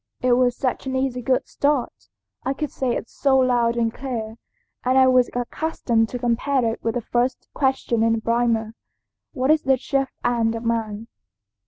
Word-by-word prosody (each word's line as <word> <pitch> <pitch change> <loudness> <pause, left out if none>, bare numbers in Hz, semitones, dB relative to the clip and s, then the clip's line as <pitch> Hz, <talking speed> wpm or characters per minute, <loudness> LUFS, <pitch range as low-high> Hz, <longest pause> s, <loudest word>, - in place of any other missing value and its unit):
It 255 - +3
was 245 0 +2
such 265 0 -2
an 260 - -2
easy 260 -1 -1
good 255 +2 0
start, 285 -3 -1 0.3
I 270 - 0
could 300 +1 -4
say 255 -3 -1
it - - -4
so 270 +1 +1
loud 245 -2 +2
and 230 -1 +1
clear, 230 -4 -5 0.5
and 255 +1 +2
I 260 - +7
was 255 -1 +4
accustomed 245 -3 -1
to 250 - -4
compare 245 +2 0
it 225 0 -2
with 225 -1 -1
the 245 - -1
first 245 +3 -1
question 265 -4 0
in 225 0 +3
the 225 - -1
Primer, 230 -1 0 0.6
'What 265 0 +1
is 310 0 +4
the 265 0 +2
chief 270 +1 -1 0.2
end 230 -2 +1
of 230 +1 -6
man?' 225 -2 -2
245 Hz, 185 wpm, -23 LUFS, 230-265 Hz, 0.6 s, I